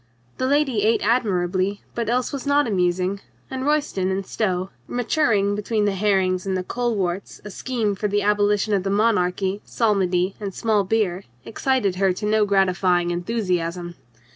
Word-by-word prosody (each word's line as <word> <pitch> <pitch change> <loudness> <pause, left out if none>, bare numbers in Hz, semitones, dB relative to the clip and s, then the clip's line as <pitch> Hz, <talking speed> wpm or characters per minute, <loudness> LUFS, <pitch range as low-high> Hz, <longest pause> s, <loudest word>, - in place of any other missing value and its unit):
The 255 - +1
lady 275 -6 +2
ate 220 +2 +2
admirably, 195 -4 0
but 235 -2 -2
else 250 +3 0
was 280 0 -5
not 285 +1 +3
amusing, 185 -1 0 0.3
and 260 +1 -3
Royston 290 -11 0
and 190 +1 -2
Stow, 185 -3 -2 0.2
maturing 235 -5 +1
between 210 +1 -1
the 205 - +2
herrings 190 -2 +1
and 190 -1 0
the 185 - -2
coleworts 200 -5 -2
a 210 - -7
scheme 230 -2 -1
for 205 +2 -2
the 205 0 0
abolition 205 0 +2
of 195 - +2
the 195 - -3
monarchy, 195 -2 +1
psalmody 190 -4 +1
and 200 -3 -5
small 215 -3 +1
beer, 195 -2 0 0.2
excited 230 -7 0
her 190 -1 +2
to 210 - -5
no 215 0 +3
gratifying 185 -3 +2
enthusiasm. 175 -3 -2
200 Hz, 160 wpm, -22 LUFS, 185-225 Hz, 0.3 s, not